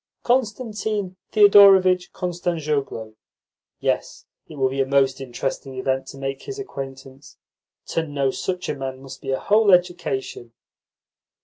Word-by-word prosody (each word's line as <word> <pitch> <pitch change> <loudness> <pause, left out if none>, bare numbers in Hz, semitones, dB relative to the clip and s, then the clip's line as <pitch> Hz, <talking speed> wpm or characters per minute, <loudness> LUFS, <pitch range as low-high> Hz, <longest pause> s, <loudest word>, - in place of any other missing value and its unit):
"Constantine 215 -5 -1 0.2
Thedorovitch 195 -3 +6
Kostanzhoglo. 155 - -3 0.7
Yes, - - -2 0.2
it 155 - -11
will 135 -2 +1
be 135 +1 -1
a - - +2
most 135 0 +2
interesting 135 +1 -4
event 130 +1 -1
to 135 - -10
make 135 0 -4
his 410 - -7
acquaintance. 135 - -9 0.5
To 165 -1 -1
know 140 -2 0
such 180 +6 -4
a - - -1
man 135 -1 -6
must 135 - -10
be 135 - -7
a 135 - +1
whole 210 0 +3
education." 175 -9 0
145 Hz, 130 wpm, -22 LUFS, 135-190 Hz, 0.7 s, Thedorovitch